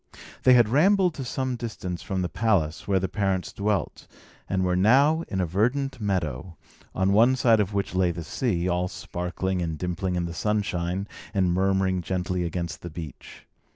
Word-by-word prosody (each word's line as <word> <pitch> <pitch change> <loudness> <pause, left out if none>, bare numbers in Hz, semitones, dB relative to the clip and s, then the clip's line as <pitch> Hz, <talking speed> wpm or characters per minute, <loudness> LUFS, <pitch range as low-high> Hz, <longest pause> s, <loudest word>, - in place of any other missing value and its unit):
They 130 - +6
had 120 -3 +6
rambled 180 - +4
to 140 - -6
some 130 0 -2
distance 105 -7 -5
from 95 -1 -2
the - - 0
palace 85 -3 0
where 95 -1 +2
their 95 - -1
parents 95 -3 -1
dwelt, 100 -4 -2 0.4
and 95 -1 0
were 90 0 +1
now 140 - +4
in 95 - -3
a 90 - +2
verdant 125 - 0
meadow, 85 -5 -2 0.4
on 95 +1 +2
one 120 +5 +5
side 115 -3 +4
of 100 0 -1
which 100 -2 -1
lay 90 -1 +2
the 85 0 -4
sea, 90 - -1
all 90 0 0
sparkling 90 +1 -3
and 80 -2 -3
dimpling 90 +2 -2
in 90 -1 -1
the 85 - -5
sunshine, 95 -1 -1 0.3
and 95 -3 +2
murmuring 95 0 +1
gently 90 0 -2
against 85 -1 -4
the 85 - -6
beach. 80 -4 -10
95 Hz, 180 wpm, -26 LUFS, 90-110 Hz, 0.4 s, They